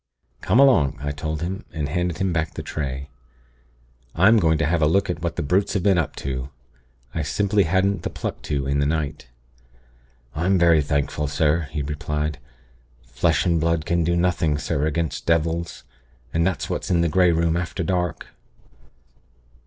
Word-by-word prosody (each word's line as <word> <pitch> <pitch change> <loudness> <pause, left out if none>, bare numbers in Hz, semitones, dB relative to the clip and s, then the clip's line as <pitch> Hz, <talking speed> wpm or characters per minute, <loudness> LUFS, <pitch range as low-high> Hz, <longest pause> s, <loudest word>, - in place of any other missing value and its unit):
'Come 120 - +2
along,' 110 - +4
I 75 +1 -3
told 75 +2 -4
him, 95 +5 -4
and 75 -2 -3
handed 90 +1 -1
him 95 0 0
back 80 -3 -2
the - - -5
tray. 70 -2 -4 1.1
'I'm 100 +7 +5
going 80 -4 +3
to 80 - +1
have 80 +2 +1
a 75 - +4
look 95 +6 +2
at - - -6
what - - -2
the - - -2
Brutes 95 +7 +1
have 95 - 0
been 95 -3 +4
up 80 - -2
to. 65 0 -4 0.6
I 80 - -1
simply 100 +6 +1
hadn't 95 +2 +1
the - - -3
pluck - - -5
to 70 -2 -1
in 70 +1 0
the 70 - +2
night.' 75 -1 -2 1.1
"'I'm 90 +5 +1
very 85 -3 +5
thankful, 70 +1 -1
sir,' 75 +2 +1
he 75 - -3
replied. 75 0 -3 0.6
'Flesh 65 +9 0
and 85 -3 +2
blood 85 -1 0
can 85 +1 +1
do 85 +1 +1
nothing, 85 -4 +1
sir, 75 +1 -1
against 80 +1 -2
devils; 85 +1 0 0.5
and 85 +2 +2
that's 95 - -2
what's - - -3
in 85 -2 +3
the 85 - +2
Grey 90 +2 +4
Room 85 0 +1
after 90 +1 -2
dark.' 90 -1 -1
80 Hz, 175 wpm, -23 LUFS, 75-90 Hz, 1.1 s, I'm